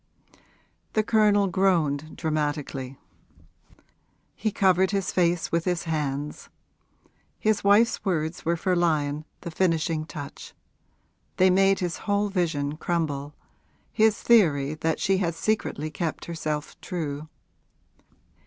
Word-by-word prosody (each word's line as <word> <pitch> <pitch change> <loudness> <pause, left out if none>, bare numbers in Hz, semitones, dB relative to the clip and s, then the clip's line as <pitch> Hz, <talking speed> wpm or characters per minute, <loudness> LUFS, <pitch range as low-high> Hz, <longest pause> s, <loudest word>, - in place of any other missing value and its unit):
The 215 - +2
Colonel 210 -2 +3
groaned, 165 -6 +1
dramatically; 145 -4 -2 1.4
he 215 - -2
covered 190 -1 +3
his 195 -1 -1
face 175 -1 +1
with 170 0 0
his 180 -2 0
hands. 150 -3 -3 0.9
His 215 -1 +1
wife's 205 +4 +4
words 165 -3 -2
were 170 +1 0
for 185 +2 0
Lyon 155 -3 0 0.2
the 170 - -6
finishing 160 -2 0
touch; 145 -4 -9 0.8
they 185 0 +5
made 195 +1 +3
his 175 -2 -2
whole 205 0 +2
vision 155 -6 -1
crumble 150 -4 -2 0.6
his 220 -1 +3
theory 155 -11 +3
that 160 +1 -1
she 195 0 +2
had 170 -3 -1
secretly 165 -6 -1
kept 165 -1 -3
herself 155 -3 -4
true. 155 -3 -4
170 Hz, 115 wpm, -26 LUFS, 150-190 Hz, 1.4 s, they